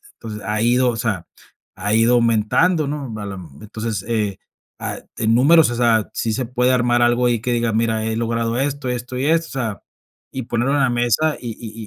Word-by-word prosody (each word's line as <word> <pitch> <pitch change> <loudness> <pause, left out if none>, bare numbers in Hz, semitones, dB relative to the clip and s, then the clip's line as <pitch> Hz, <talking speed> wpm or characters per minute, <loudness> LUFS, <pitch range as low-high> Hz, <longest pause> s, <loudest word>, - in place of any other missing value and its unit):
entonces, 105 -1 -8
ha 105 0 -1
ido, 125 +2 +3
o 120 - -2
sea, 105 -7 -2 0.5
ha 105 0 -2
ido 115 +2 +4
aumentando, 120 - +2
¿no? 140 -5 -4
A - - -5
lo 100 -1 -6
mej 85 -4 -11
entonces, 110 0 -4
eh, 105 -4 -1 0.4
ah, - - -4 0.2
en 115 0 +2
números, 150 +2 +5
o 120 - -3
sea, 115 -3 +2
sí 115 - -1
se 130 +2 -2
puede 125 +1 +1
armar 120 -1 +2
algo 120 +1 +3
ahí 120 -2 +1
que 125 +1 -2
diga, 115 -2 0
mira, 110 -1 0
he 110 0 -1
logrado 115 0 -1
esto, 140 -1 -2
esto 125 +1 -4
y 130 - -1
esto, 165 +1 +2
o - - -14
sea, 115 -6 -4 0.5
y 130 - -4
ponerlo 120 +4 -1
en - - +2
la 135 - +3
mesa 120 +6 +1
y 120 - -6
y 110 0 -8
120 Hz, 220 wpm, -20 LUFS, 110-125 Hz, 0.5 s, números